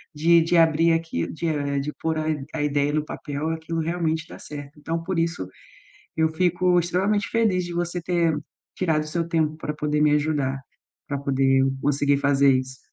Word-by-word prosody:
de 165 Hz, +3 st, +5 dB
de 165 Hz, +2 st, +1 dB
abrir 165 Hz, 0 st, +4 dB
aqui, 165 Hz, -, -1 dB
de 165 Hz, +2 st, -3 dB
eh, 145 Hz, -3 st, -1 dB
de 145 Hz, +2 st, -3 dB
pôr 160 Hz, -1 st, 0 dB
a 155 Hz, 0 st, -1 dB
i 150 Hz, -3 st, -2 dB
a 160 Hz, -, -2 dB
ideia 145 Hz, 0 st, +1 dB
no 155 Hz, 0 st, +1 dB
papel, 150 Hz, +1 st, -4 dB
aquilo 165 Hz, 0 st, -3 dB
realmente 165 Hz, -1 st, -1 dB
dá -, -, -10 dB
certo. 145 Hz, 0 st, -9 dB
Então 165 Hz, +2 st, -3 dB
por 185 Hz, +1 st, -3 dB
isso, 165 Hz, -, -1 dB, 0.7 s
eu 160 Hz, 0 st, +3 dB
fico 180 Hz, +2 st, +2 dB
extremamente 190 Hz, +5 st, 0 dB
feliz 220 Hz, -6 st, +2 dB
de 175 Hz, -, -6 dB
você 175 Hz, +1 st, -2 dB
ter 170 Hz, -2 st, +1 dB, 0.4 s
tirado 160 Hz, -4 st, +1 dB
o -, -, -9 dB
seu 170 Hz, +1 st, -2 dB
tempo 160 Hz, -2 st, 0 dB
para 155 Hz, -1 st, -4 dB
poder 150 Hz, 0 st, -1 dB
me 150 Hz, -1 st, +4 dB
ajudar, 145 Hz, -3 st, 0 dB, 0.5 s
para 140 Hz, -, -2 dB
poder 135 Hz, -1 st, +2 dB, 0.2 s
conseguir 145 Hz, 0 st, +2 dB
fazer 140 Hz, -1 st, +4 dB
isso. 130 Hz, 0 st, -6 dB
160 Hz, 190 wpm, -24 LUFS, 145-170 Hz, 0.7 s, de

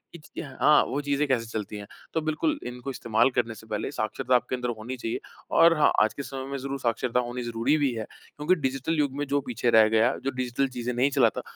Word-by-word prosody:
कि 155 Hz, -, -9 dB
हाँ, 145 Hz, +2 st, +3 dB
वो 145 Hz, +2 st, -2 dB
चीज़ें 145 Hz, +1 st, 0 dB
कैसे 120 Hz, -4 st, +1 dB
चलती 105 Hz, -2 st, -5 dB
हैं। 100 Hz, 0 st, -8 dB, 0.3 s
तो 160 Hz, -, +1 dB
बिल्कुल 220 Hz, -, -1 dB
इनको 125 Hz, +2 st, -6 dB
इस्तेमाल 115 Hz, 0 st, +2 dB
करने 120 Hz, -2 st, 0 dB
से 110 Hz, +2 st, -14 dB
पहले 105 Hz, -1 st, -3 dB
साक्षरता 125 Hz, +4 st, 0 dB
आपके 125 Hz, +1 st, +1 dB
अंदर 125 Hz, -1 st, -3 dB
होनी 125 Hz, +4 st, -6 dB
चाहिए 115 Hz, -1 st, -3 dB, 0.4 s
और 165 Hz, -1 st, +6 dB
हाँ, 150 Hz, -, +5 dB
आज 110 Hz, -, 0 dB
के 140 Hz, -, -6 dB
समय 135 Hz, -1 st, -6 dB
में 140 Hz, -, -2 dB
ज़रूर 135 Hz, +1 st, -4 dB
साक्षरता 120 Hz, +1 st, 0 dB
होनी 120 Hz, 0 st, -3 dB
ज़रूरी 120 Hz, +6 st, +1 dB
भी 140 Hz, -4 st, +1 dB
है, 110 Hz, -1 st, -3 dB, 0.3 s
क्योंकि 160 Hz, +5 st, +2 dB
डिजिटल 135 Hz, +5 st, -1 dB
युग 140 Hz, -2 st, +1 dB
में 145 Hz, -, -1 dB
जो 140 Hz, 0 st, +1 dB
पीछे 120 Hz, -1 st, -1 dB
रह 110 Hz, -1 st, +7 dB
गया, 115 Hz, +3 st, +3 dB
जो 135 Hz, -, 0 dB
डिजिटल 130 Hz, +1 st, -1 dB
चीज़ें 125 Hz, -1 st, -4 dB
नहीं 130 Hz, +4 st, +2 dB
चलाता 135 Hz, -2 st, +2 dB
130 Hz, 230 wpm, -26 LUFS, 115-140 Hz, 0.4 s, रह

